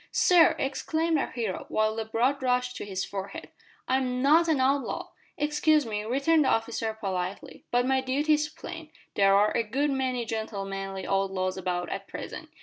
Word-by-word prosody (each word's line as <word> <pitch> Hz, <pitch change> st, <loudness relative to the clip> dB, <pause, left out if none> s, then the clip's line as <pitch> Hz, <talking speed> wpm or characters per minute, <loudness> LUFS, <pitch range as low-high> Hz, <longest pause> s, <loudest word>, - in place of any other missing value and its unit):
"Sir!" 355 Hz, -2 st, +5 dB
exclaimed 315 Hz, +4 st, 0 dB
our -, -, -1 dB
hero, 225 Hz, -7 st, -4 dB
while 215 Hz, 0 st, +1 dB
the 225 Hz, 0 st, -3 dB
blood 245 Hz, +6 st, +1 dB
rushed 250 Hz, -1 st, 0 dB
to -, -, -5 dB
his 190 Hz, -2 st, -3 dB
forehead, 195 Hz, 0 st, -6 dB, 0.4 s
"I 260 Hz, -, +3 dB
am 250 Hz, -1 st, -1 dB
not 320 Hz, +4 st, +5 dB
an 315 Hz, -4 st, +2 dB
outlaw!" 270 Hz, +1 st, 0 dB, 0.3 s
"Excuse 300 Hz, 0 st, +2 dB
me," 210 Hz, -2 st, -3 dB
returned 280 Hz, +7 st, +3 dB
the -, -, +3 dB
officer 225 Hz, -1 st, -1 dB
politely, 185 Hz, -1 st, -4 dB
"but 245 Hz, 0 st, +2 dB
my 265 Hz, 0 st, +2 dB
duty 280 Hz, +4 st, +1 dB
is 300 Hz, 0 st, +1 dB
plain. 320 Hz, +1 st, -9 dB, 0.2 s
There 195 Hz, 0 st, +4 dB
are 205 Hz, +1 st, +3 dB
a -, -, +3 dB
good 270 Hz, +7 st, 0 dB
many 255 Hz, -3 st, -1 dB
gentlemanly 195 Hz, -3 st, -4 dB
outlaws 190 Hz, -1 st, 0 dB
about 180 Hz, -1 st, -2 dB
at 195 Hz, +2 st, -5 dB
present. -, -, -7 dB
245 Hz, 175 wpm, -27 LUFS, 200-280 Hz, 0.4 s, Sir